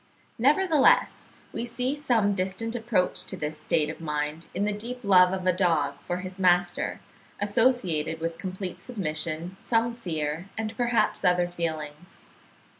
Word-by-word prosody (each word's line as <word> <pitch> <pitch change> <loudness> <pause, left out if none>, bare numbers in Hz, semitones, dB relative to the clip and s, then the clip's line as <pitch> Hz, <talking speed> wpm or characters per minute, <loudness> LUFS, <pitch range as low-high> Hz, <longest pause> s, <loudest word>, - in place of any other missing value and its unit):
Nevertheless, 300 +3 +3 0.2
we - - -3
see 250 +3 -2
some 240 -9 +1
distant 195 +5 -2
approach 220 -6 0
to 190 - -4
this 150 -1 -4
state 150 -2 +1
of - - -7
mind 150 +1 -3
in 195 - 0
the 210 0 0
deep 240 +4 -5
love 180 -3 +6
of 190 -1 -3
a 185 - +4
dog 160 -6 +1
for 180 +1 -4
his 185 0 -8
master, 180 -1 +2 0.4
associated 205 -8 +1
with 165 0 -4
complete 185 0 -5
submission, 170 -5 -3
some 235 0 +1
fear, 165 -5 -4
and 220 0 -3
perhaps 240 -1 +1
other 180 0 +3
feelings. 160 -1 -5
185 Hz, 145 wpm, -27 LUFS, 165-225 Hz, 0.4 s, love